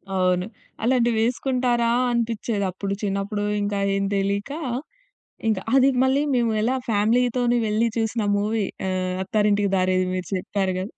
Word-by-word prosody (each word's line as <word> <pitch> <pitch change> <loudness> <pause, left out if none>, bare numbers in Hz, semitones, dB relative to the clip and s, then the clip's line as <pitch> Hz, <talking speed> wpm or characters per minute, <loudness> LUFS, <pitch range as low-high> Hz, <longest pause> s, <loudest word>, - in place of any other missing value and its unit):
అవును. 180 -1 +2 0.4
అలాంటివి 240 -1 +2
వేసుకుంటారా? 245 0 +1 0.2
అనిపిచ్చేది 230 -3 -1
అప్పుడు. 195 +2 -4
చిన్నప్పుడు 200 +1 -2 0.2
ఇంకా 205 0 -1 0.2
ఏం 195 - 0
తెలియక 200 +5 -1 1.0
ఇంక 215 -3 +2 0.2
అది 270 0 +6
మళ్ళీ 265 +2 +2
మేము 235 -2 +2
ఎలా 235 +4 +1 0.2
ఫ్యామిలీ‌తోని 240 +3 +2
వెళ్లి 215 +2 +2
చూసిన 225 0 0
మూవీ 210 +1 0 0.2
ఆహ్, 185 -1 -1
'అత్తారింటికి 205 0 +1
దారేది' 185 0 +1
మీరు 185 -2 -3
చెప్పారు 190 +1 -1
కదా! 190 +4 -5
210 Hz, 130 wpm, -23 LUFS, 195-235 Hz, 1.0 s, అది